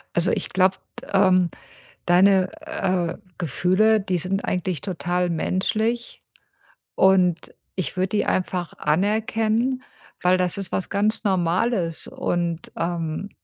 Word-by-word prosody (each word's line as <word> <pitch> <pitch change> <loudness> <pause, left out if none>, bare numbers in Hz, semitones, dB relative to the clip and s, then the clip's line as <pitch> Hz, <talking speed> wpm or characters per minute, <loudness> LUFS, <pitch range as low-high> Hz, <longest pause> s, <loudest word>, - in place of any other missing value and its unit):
Also, 175 +1 +3
ich - - -2
glaube, 185 +1 +2 0.4
ähm, 185 -3 +4 0.6
deine, 185 +1 +4
äh, 185 - -1 0.2
Gefühle, 185 - +2
die 190 -2 -1
sind 185 +4 -2
eigentlich 180 -4 -2
total 180 -1 -1
menschlich. 220 +8 -1 0.7
Und 185 -3 +3 0.2
ich 185 0 -3
würde 185 +1 +1
die 210 +2 0
einfach 180 -2 -1
anerkennen, 220 +7 +1 0.4
weil 180 +1 +4
das 180 -2 +1
ist 195 -2 -2
was 190 - -2
ganz 210 +3 0
Normales. 180 -1 0
Und, 170 -1 -2
ähm, 170 +2 -3
185 Hz, 115 wpm, -23 LUFS, 175-200 Hz, 0.7 s, ähm